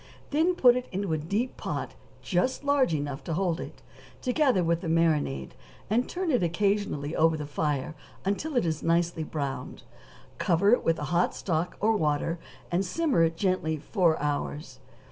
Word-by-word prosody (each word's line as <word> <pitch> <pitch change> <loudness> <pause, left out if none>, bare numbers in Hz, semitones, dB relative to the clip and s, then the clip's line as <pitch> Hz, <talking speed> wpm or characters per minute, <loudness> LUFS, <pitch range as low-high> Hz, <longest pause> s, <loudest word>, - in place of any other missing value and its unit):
Then 325 +5 +2
put 245 -6 +6
it 250 0 -3
into 195 -3 -2
a - - +1
deep 205 +11 -2
pot - - -4 0.3
just 215 +10 0
large 285 -6 +3
enough 145 -1 -4
to 165 - -2
hold 180 -2 0
it, - - -8 0.4
together 255 - +2
with 170 0 +1
the 170 - -4
marinade, 155 - +1 0.4
and 240 +4 +2
turn 360 -2 -1
it 250 - +2
occasionally 175 -4 0
over 160 0 +3
the 150 - -4
fire 145 0 -2 0.3
until 250 +9 -1
it 240 - +2
is 160 -2 -1
nicely 170 -1 +1
browned; 140 -4 -5 0.6
cover 185 +4 +3
it 245 - +4
with 165 -1 +2
hot 170 +5 0
stock 170 -1 -2
or 220 +2 +3
water, 155 0 0 0.3
and 175 +2 +2
simmer 270 - +1
it 165 0 +1
gently 185 -5 0
four 165 +1 +1
hours. 145 -2 -3
170 Hz, 165 wpm, -28 LUFS, 155-210 Hz, 0.6 s, put